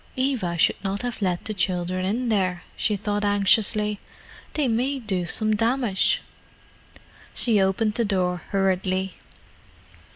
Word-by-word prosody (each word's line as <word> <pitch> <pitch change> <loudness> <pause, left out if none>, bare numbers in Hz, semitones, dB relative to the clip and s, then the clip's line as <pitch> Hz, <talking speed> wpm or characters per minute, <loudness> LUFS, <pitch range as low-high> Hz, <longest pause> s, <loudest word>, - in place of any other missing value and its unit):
"Eva 255 -10 -1
should 165 - +2
not 195 +2 -2
have 245 -2 -4
let 180 -3 -1
the 215 - -1
children 185 -1 -1
in 235 +5 -1
there," 185 -4 0
she 210 - +1
thought 205 +1 -2
anxiously. 205 +1 +3 0.6
"They 295 -3 +1
may 250 +4 0
do 190 -8 -3
some 215 +5 0
damage." 230 -3 +1 1.1
She 220 -5 +3
opened 195 +3 +1
the 235 +1 0
door 180 -3 0
hurriedly. 190 -1 0
205 Hz, 130 wpm, -24 LUFS, 185-225 Hz, 1.1 s, anxiously